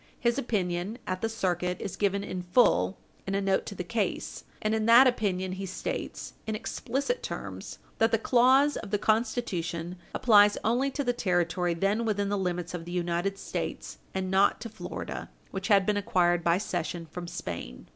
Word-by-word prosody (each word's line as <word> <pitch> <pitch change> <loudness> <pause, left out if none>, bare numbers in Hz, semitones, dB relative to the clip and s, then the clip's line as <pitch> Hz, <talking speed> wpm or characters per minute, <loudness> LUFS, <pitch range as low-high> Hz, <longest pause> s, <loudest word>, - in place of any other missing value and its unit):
His 235 +2 +1
opinion 195 -3 -1
at 185 0 -3
the 225 - 0
circuit 180 -4 -1
is 195 - -5
given 200 -1 0
in 185 -2 -4
full 180 - +3 0.3
in 195 - -1
a - - +2
note 195 -1 +1
to 200 - -6
the 180 - -4
case, 205 +1 -2
and 215 0 0
in 220 0 0
that 235 +3 +9
opinion 195 -7 +1
he 190 +1 -4
states, 185 - -5
in 220 - -1
explicit 270 - -2
terms, - - -6 0.2
that 225 - +4
the 225 - +4
clause 260 +5 +4
of 210 - -6
the 205 - +1
Constitution 190 -7 -1 0.2
applies 205 -3 +6
only 245 +5 +2
to 285 +1 -2
the 245 -2 +1
territory 175 -4 0
then 200 +6 +1
within 205 -3 0
the 205 - +1
limits 180 -1 -2
of 170 -2 -5
the 175 - -7
United 175 +2 -1
States, - - -5
and 190 -1 -2
not 190 +1 +4
to 230 - -5
Florida, - - -6 0.2
which 195 +1 -4
had 200 -3 +5
been 210 0 +1
acquired 175 -3 +2
by 170 +1 +3
cession 175 -3 -3
from 175 +2 -7
Spain. 85 - -6
195 Hz, 185 wpm, -28 LUFS, 180-225 Hz, 0.3 s, that